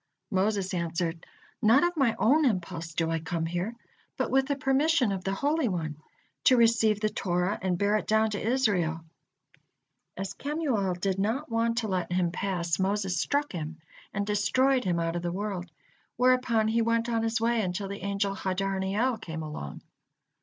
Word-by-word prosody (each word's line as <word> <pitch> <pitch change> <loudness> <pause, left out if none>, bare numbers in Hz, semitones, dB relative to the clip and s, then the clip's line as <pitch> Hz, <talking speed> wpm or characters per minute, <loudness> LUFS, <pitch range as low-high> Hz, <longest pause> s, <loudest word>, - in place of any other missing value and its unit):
Moses 195 -1 0
answered: 170 -1 -2 0.3
"Not 235 +6 +5
of 350 0 +1
my 265 -7 +2
own 295 +8 +4
impulse 170 - -1
do 165 -1 0
I 165 - 0
come 165 +1 -2
here, 175 +7 -3 0.4
but - - -1
with 265 0 +3
the 285 - 0
permission 270 -2 +2
of 190 -2 -3
the 195 +1 -1
Holy 295 +3 +1
One, 160 -6 -3 0.5
to 255 - +6
receive 225 -2 +4
the 215 - +1
Torah 180 0 -1
and 185 -2 0
bear 205 +3 +2
it - - -5
down 220 0 +3
to 205 - -3
Israel." 200 -10 +1 1.2
As 195 0 -4
Kemuel 270 - -1
did 195 0 -1
not 230 +8 -1
want 230 0 +1
to 230 -2 0
let 185 -3 -2
him 175 -1 +1
pass, 175 -2 -1
Moses 195 -1 0
struck 290 +1 0
him 160 -2 -5 0.3
and 200 0 -2
destroyed 255 +5 +2
him 175 -2 +1
out 165 0 -1
of 175 - -2
the 175 0 -2
world, 190 -2 -4 0.5
whereupon 250 -3 +3
he 230 +1 +2
went 230 0 +1
on 230 -1 0
his 225 0 0
way 230 0 +2
until 190 +1 -2
the 200 +1 -6
angel 200 0 -1
Hadarniel 195 +5 -1
came 160 -5 -5
along. 150 - -7
200 Hz, 175 wpm, -28 LUFS, 180-230 Hz, 1.2 s, to